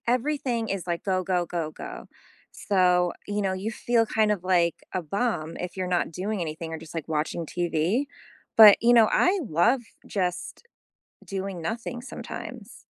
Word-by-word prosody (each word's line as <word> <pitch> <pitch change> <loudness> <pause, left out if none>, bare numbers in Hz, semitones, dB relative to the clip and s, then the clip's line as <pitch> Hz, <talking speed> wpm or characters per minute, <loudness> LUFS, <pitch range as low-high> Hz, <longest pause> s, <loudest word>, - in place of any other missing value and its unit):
Everything 250 -2 0
is, 195 -2 -3
like, 170 -1 -2
go, 185 -2 0
go, 180 -1 0
go, 165 -2 -3
go. - - -8 0.5
So, 180 -3 +2
you 205 0 -1
know, 190 -1 0
you 195 +4 -3
feel 235 -1 +1
kind 215 -1 +2
of, 200 -4 -2
like, 175 -3 +2 0.2
a 185 - -1
bum, 170 -2 -2
if 180 +1 -6
you're 185 -1 -2
not 175 -2 0
doing 195 +4 -3
anything, 160 0 -5
or - - -3
just, 160 -1 -12
like, 165 - -4
watching 160 +1 -2
TV. 175 - 0 0.5
But, 215 -3 +10
you 240 +1 +5
know, 230 -2 +7
I 380 +2 +3
love 225 - +3 0.3
just 180 -3 -3 0.6
doing 195 -2 -4
nothing 230 +6 -4
sometimes. 265 - -8
185 Hz, 165 wpm, -26 LUFS, 170-225 Hz, 0.6 s, But